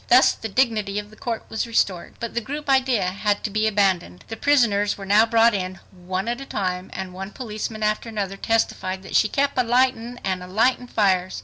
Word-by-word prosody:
Thus 255 +2 +6
the 225 - -6
dignity 215 -3 +1
of 210 0 -5
the - - -15
court 230 0 -4
was 220 - -3
restored. 195 -6 0
But 235 - -5
the 235 - -1
group 290 +6 -6
idea 260 -6 +3
had 205 +3 -1
to 215 - -2
be 215 +1 +1
abandoned. 190 - 0
The 225 - -4
prisoners 225 -7 +2
were 195 - -8
now 210 +3 +5
brought 230 0 +4
in 185 -1 -3
one 185 +2 -4
at 240 +2 -2
a - - -6
time, 185 -2 -3
and 190 -1 -6
one 190 +1 -6
policeman 215 -1 -5
after 215 +2 0
another 200 -3 -3
testified 195 -3 -1
that, 190 - -7
"she 215 - +4
kep' 280 0 +1
alightin' 245 -1 +1
and 185 -1 -1
alightin' 230 +7 +1
fires." 190 -3 +1
215 Hz, 205 wpm, -23 LUFS, 190-235 Hz, -, Thus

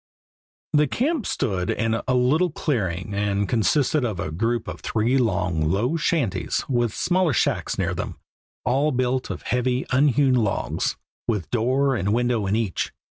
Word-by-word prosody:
The 150 0 +4
camp 275 - -1
stood 95 -9 -1
in 115 0 0
a 130 - +2
little 145 +9 +3
clearing, 100 - -2
and 100 0 0
consisted 130 +6 +2
of 110 -7 -2
a 75 - -3
group 115 +7 -1
of - - -6
three 115 +4 0
long, 90 -9 0
low 115 - +1
shanties 155 - 0
with 120 -3 +1
smaller 180 - +1
shacks - - 0
near - - 0
them, - - -4 0.5
all 135 +4 +2
built 130 0 0
of - - -5
heavy, 125 +1 0
unhewn 135 0 +3
logs, 110 -5 0 0.3
with 105 -7 -2
door 130 +4 +2
and 100 0 0
window 120 -4 +1
in 100 - +1
each. 110 -5 -1
120 Hz, 155 wpm, -24 LUFS, 105-135 Hz, 0.5 s, The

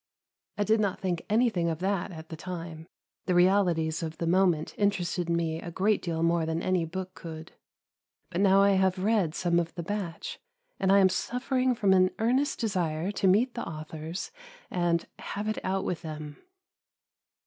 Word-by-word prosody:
I 205 - +2
did 220 +2 +3
not 200 -3 0
think 180 -3 -2
anything 215 -6 +2
of 160 - -2
that 190 +1 -1
at 160 -2 -10
the 160 - -6
time, 165 -1 -7 0.4
the 180 - +2
realities 175 -4 +3
of 160 -1 -5
the 170 - -2
moment 175 -2 +2
interested 185 -4 0
me 165 -1 0
a - - -6
great 200 +5 +1
deal 165 -2 -2
more 170 0 +2
than 160 +1 -1
any 185 -3 +1
book 185 +3 -5
could; 160 -2 -9 0.8
but 180 +1 -1
now 195 0 +5
I 200 - +5
have 190 -1 +2
read 190 -4 +1
some 175 -1 +2
of 165 -1 -3
the 170 - -4
batch, 190 -3 -4 0.4
and 190 - +2
I 200 - +7
am 190 -1 +6
suffering 255 +5 0
from 200 -4 +3
an 185 -1 +5
earnest 260 +7 +1
desire 180 -5 -1
to 195 - 0
meet 230 +7 +3
the 235 - -4
authors 160 - -6 0.4
and 175 -2 +1
"have 205 +1 -4
it 215 - -2
out 190 +1 -1
with 175 - -2
them." 155 -2 -7
180 Hz, 180 wpm, -28 LUFS, 165-200 Hz, 0.8 s, I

